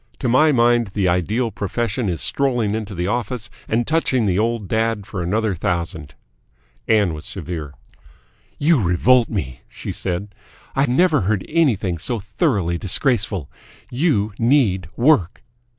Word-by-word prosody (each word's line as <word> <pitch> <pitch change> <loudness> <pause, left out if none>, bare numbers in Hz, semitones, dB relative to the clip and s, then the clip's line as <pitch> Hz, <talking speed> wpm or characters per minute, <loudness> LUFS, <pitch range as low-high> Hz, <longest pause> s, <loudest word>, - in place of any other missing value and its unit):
To 130 - -2
my 130 +6 +4
mind 120 -2 +3
the 100 -3 +1
ideal 105 +7 0
profession 110 +2 -2
is 80 -7 -3
strolling 120 - 0
into 110 -2 -4
the 90 +1 -2
office 115 +1 -3 0.2
and 115 +2 0
touching 140 -7 +1
the 95 -1 +1
old 115 -2 -1
dad 110 -1 0
for 95 -2 -5
another 105 +4 0
thousand." 85 -4 -3 0.7
Ann 105 -6 +3
was 75 - -8
severe. 80 -5 -6 0.8
"You 150 -3 +3
revolt 115 +7 +3
me!" 65 - -4
she - - -6
said. 100 +2 -3 0.4
"I 135 +1 +2
never 150 +3 +3
heard 100 +1 -1
anything 105 - +1
so 120 +8 -2
thoroughly 100 - -1
disgraceful. 105 - 0 0.4
You 120 - +1
need 115 - +2
work!" 120 - +2
110 Hz, 140 wpm, -20 LUFS, 90-125 Hz, 0.8 s, my